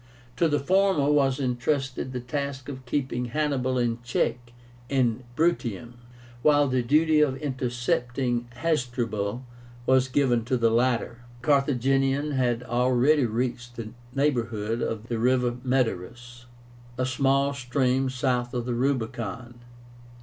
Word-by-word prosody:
To 170 Hz, -, +3 dB
the 145 Hz, -2 st, +1 dB
former 180 Hz, -2 st, +2 dB
was 135 Hz, -2 st, +2 dB
intrusted 130 Hz, +1 st, -1 dB
the 125 Hz, -, -3 dB
task 135 Hz, +1 st, -4 dB
of 130 Hz, -2 st, -8 dB
keeping 130 Hz, -2 st, -1 dB
Hannibal 130 Hz, -1 st, 0 dB
in 120 Hz, -1 st, 0 dB
check 120 Hz, 0 st, -2 dB, 0.4 s
in 125 Hz, -3 st, +1 dB
Bruttium, 125 Hz, -, 0 dB, 0.5 s
while 145 Hz, +1 st, +4 dB
the 130 Hz, -1 st, +1 dB
duty 155 Hz, +5 st, +3 dB
of 135 Hz, -3 st, +2 dB
intercepting 125 Hz, -2 st, -1 dB
Hasdrubal 120 Hz, -6 st, -1 dB, 0.4 s
was 130 Hz, 0 st, +4 dB
given 125 Hz, -3 st, +2 dB
to 130 Hz, +1 st, +1 dB
the 115 Hz, -1 st, +2 dB
latter. 120 Hz, 0 st, +1 dB, 0.2 s
The -, -, -12 dB
Carthaginian 135 Hz, 0 st, +2 dB
had 125 Hz, -3 st, 0 dB
already 125 Hz, +3 st, +3 dB
reached 120 Hz, +1 st, -3 dB
the 115 Hz, -2 st, -6 dB, 0.3 s
neighborhood 120 Hz, -5 st, 0 dB
of 110 Hz, 0 st, -3 dB
the 115 Hz, -2 st, -2 dB
river 125 Hz, 0 st, +2 dB
Metaurus, 120 Hz, -1 st, -2 dB, 0.5 s
a 130 Hz, -, 0 dB
small 135 Hz, +2 st, +2 dB
stream 130 Hz, 0 st, 0 dB
south 125 Hz, -2 st, -1 dB
of 120 Hz, -1 st, -2 dB
the 125 Hz, -, -2 dB
Rubicon. 120 Hz, -2 st, -2 dB
125 Hz, 130 wpm, -26 LUFS, 120-135 Hz, 0.5 s, while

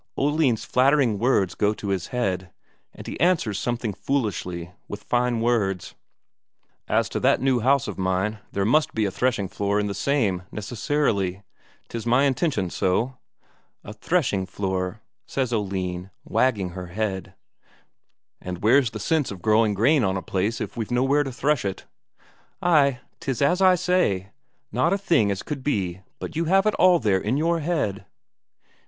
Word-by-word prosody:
Oline's 145 Hz, -5 st, +1 dB
flattering 130 Hz, -5 st, +3 dB
words 105 Hz, -6 st, +2 dB
go 105 Hz, +1 st, +1 dB
to 100 Hz, -, -5 dB
his 95 Hz, -3 st, -1 dB
head, 95 Hz, -7 st, -2 dB, 0.4 s
and -, -, -12 dB
he -, -, -6 dB
answers 165 Hz, -, +2 dB
something 120 Hz, -3 st, -2 dB
foolishly 90 Hz, -9 st, -2 dB, 0.2 s
with 105 Hz, -, -7 dB
fine 120 Hz, -1 st, 0 dB
words: 105 Hz, -6 st, 0 dB, 0.9 s
"As -, -, +2 dB
to -, -, -2 dB
that -, -, +3 dB
new 130 Hz, -1 st, +2 dB
house 135 Hz, +3 st, +2 dB
of 105 Hz, -, -6 dB
mine, 95 Hz, +3 st, 0 dB
there 100 Hz, 0 st, -1 dB
must 150 Hz, +8 st, +2 dB
be 110 Hz, -1 st, +1 dB
a 100 Hz, -, -1 dB
threshing 120 Hz, -2 st, 0 dB
floor 100 Hz, +2 st, -1 dB
in 105 Hz, -, 0 dB
the 100 Hz, -, -2 dB
same, 100 Hz, -4 st, 0 dB
necessarily. 105 Hz, -4 st, -1 dB, 0.4 s
'Tis 115 Hz, 0 st, -6 dB
my 125 Hz, +4 st, +4 dB
intention 135 Hz, -, 0 dB
so." 120 Hz, +8 st, 0 dB, 0.6 s
"A 105 Hz, -, -8 dB
threshing 110 Hz, -, 0 dB
floor?" 95 Hz, +1 st, -3 dB, 0.3 s
says 130 Hz, -3 st, -1 dB
Oline, 95 Hz, -3 st, -2 dB, 0.2 s
wagging 105 Hz, -8 st, +1 dB
her 90 Hz, 0 st, -7 dB
head. 95 Hz, 0 st, -3 dB, 1.1 s
"And 90 Hz, 0 st, -6 dB
where's 125 Hz, +3 st, +5 dB
the 110 Hz, -, -7 dB
sense 150 Hz, +5 st, 0 dB
of 95 Hz, -3 st, -8 dB
growing 110 Hz, -1 st, +3 dB
corn 130 Hz, +7 st, +3 dB
on 95 Hz, -1 st, +1 dB
the 95 Hz, -, -3 dB
place 100 Hz, +5 st, -1 dB
if -, -, -5 dB
we've 115 Hz, -3 st, -4 dB
nowhere 135 Hz, +4 st, +2 dB
to 135 Hz, -, -5 dB
thresh 140 Hz, +2 st, 0 dB
it?" 100 Hz, -1 st, -4 dB, 0.7 s
"Ay, 140 Hz, -7 st, +3 dB, 0.2 s
'tis 135 Hz, -3 st, -3 dB
as 175 Hz, +7 st, +2 dB
I 185 Hz, -1 st, +6 dB
say, 130 Hz, -, 0 dB, 0.4 s
not 170 Hz, -, +2 dB
a -, -, +2 dB
thing 170 Hz, -, +2 dB
as 100 Hz, -1 st, -2 dB
could 145 Hz, -3 st, -5 dB
be 95 Hz, -10 st, -1 dB, 0.2 s
but -, -, -7 dB
you 165 Hz, +2 st, 0 dB
have 195 Hz, +4 st, +3 dB
it 215 Hz, -, +3 dB
all 180 Hz, -1 st, +6 dB
there 100 Hz, -, +1 dB
in 115 Hz, +6 st, 0 dB
your 165 Hz, +2 st, +1 dB
head." 150 Hz, -, -2 dB
115 Hz, 165 wpm, -24 LUFS, 95-140 Hz, 1.1 s, I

